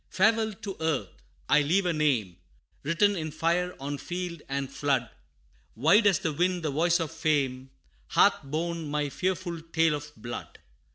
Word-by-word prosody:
"Farewell 220 +2 +2
to 195 -2 -4
earth! 150 - 0 0.4
I 150 +1 +5
leave 180 +7 +2
a 175 - +1
name, 125 - +1 0.4
Written 200 +7 +2
in 155 -3 -3
fire, 175 +4 0
on 140 +1 -4
field 175 -2 -5
and 135 0 -2
flood 135 -3 -1 0.6
Wide 180 - +5
as 195 - +4
the 155 - -2
wind, 180 +2 0
the 155 - 0
voice 170 +4 +2
of 165 -2 -2
fame, 140 -5 0 0.4
Hath - - +4
borne 160 +2 -3
my 145 -1 -1
fearful 180 0 -2
tale 165 -1 +2
of 150 0 -5
blood. 120 0 -7
160 Hz, 160 wpm, -28 LUFS, 145-175 Hz, 0.6 s, I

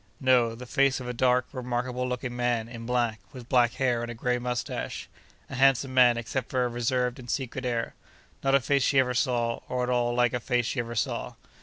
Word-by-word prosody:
'No. 125 -3 +3
The 125 +2 -9
face 135 +1 +2
of 125 - -7
a 125 - -3
dark, 125 0 +2
remarkable 125 0 -2
looking 125 0 -4
man, 120 -2 0
in 115 -1 -8
black, 120 -3 0
with 125 -2 -10
black 120 -2 +3
hair 125 -3 0
and 120 - -4
a 120 - -6
grey 125 +2 0
moustache—a 125 +2 -6
handsome 135 0 +3
man 125 -2 +5
except 120 +2 -3
for 130 -1 +1
a - - -1
reserved 125 +2 -1
and 120 -1 -11
secret 130 0 -3
air. 120 -1 -2 0.5
Not 135 0 +3
a - - +5
face 140 +2 +1
she 135 - +2
ever 125 -1 +3
saw, 120 -1 0
or 125 0 -1
at 125 - -1
all 120 -1 +1
like 120 -1 +2
a 125 - 0
face 120 0 0
she 120 - -2
ever 120 0 -4
saw. 110 - -2
125 Hz, 215 wpm, -27 LUFS, 120-130 Hz, 0.5 s, man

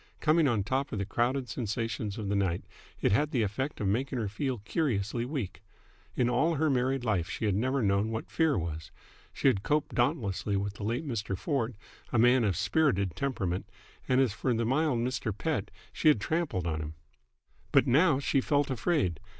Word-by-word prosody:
Coming 155 0 +4
on 115 -6 +1
top 135 +6 -1
of - - -3
the 100 - -1
crowded 125 +5 0
sensations 115 -2 -3
of 105 -3 -4
the 100 - 0
night, 95 -3 0 0.4
it - - +3
had 145 +9 +2
the 125 -6 +1
effect 130 +8 -3
of 105 - 0
making 130 +6 0
her 110 -3 -1
feel 125 +6 -2
curiously 115 - -1
weak. 125 - -4 0.5
In 125 - +2
all 150 +7 +2
her 155 0 +2
married 130 0 0
life 95 -7 0
she - - -3
had 105 - +2
never 130 +6 0
known 100 +1 +2
what 110 0 -5
fear 160 -3 +2
was. 80 -2 -4 0.4
She - - 0
had 115 -8 +3
coped 150 +6 0
dauntlessly 115 - 0
with 100 0 -2
the 100 - -9
late 120 +8 -2
Mr. 105 -6 -2
Ford, 125 - -1 0.4
a - - +1
man 120 +2 +5
of 100 -5 +1
a - - -4
spirited 100 - +1
temperament; 100 -7 -2 0.4
and 130 0 +4
as 130 -6 +3
for 125 - -1
the 115 +1 0
mild 135 +2 +2
Mr. 120 -3 -2
Pett 120 -8 -1 0.2
she - - 0
had 150 -8 +6
trampled 140 - -1
on 80 -2 -1
him. 75 0 -6 0.8
But - - +5
now 150 +3 +4
she 140 0 +1
felt 145 0 +1
afraid. 120 - 0
120 Hz, 200 wpm, -30 LUFS, 100-135 Hz, 0.8 s, had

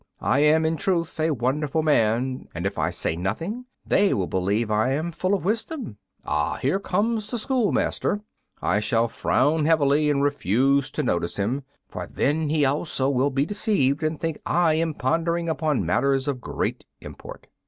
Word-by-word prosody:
I 135 - +2
am, 155 +2 +4
in 160 0 0
truth, 170 -3 -1
a 160 +1 +2
wonderful 145 +3 0
man, 130 -2 +1
and 85 +2 -4
if 100 - -2
I - - +1
say 80 - -2
nothing 165 - -3 0.2
they 200 0 +3
will 95 - 0
believe 100 +6 -1
I 110 +5 +2
am 160 +4 -2
full 185 +4 0
of 190 - -5
wisdom. 225 - -2 0.3
Ah, 75 0 0
here 140 +9 0
comes 210 +3 -1
the 245 - -2
schoolmaster; 225 -3 0 0.4
I 105 - +2
shall 115 +2 +2
frown 150 +6 +1
heavily 150 -1 +3
and 140 -1 +1
refuse 140 +1 +2
to 150 - -1
notice 85 -7 -1
him, 115 +8 -1 0.3
for - - -6
then 150 +2 0
he 150 -1 +2
also 140 -1 0
will 135 +1 +2
be 135 +1 0
deceived 195 - +1
and 155 0 -1
think 165 -2 -3
I 170 -2 +2
am 160 -1 0
pondering 170 +5 0
upon 155 - 0
matters 135 - +1
of 135 -3 -2
great - - -3 0.2
import." - - -10
145 Hz, 175 wpm, -24 LUFS, 125-165 Hz, 0.4 s, am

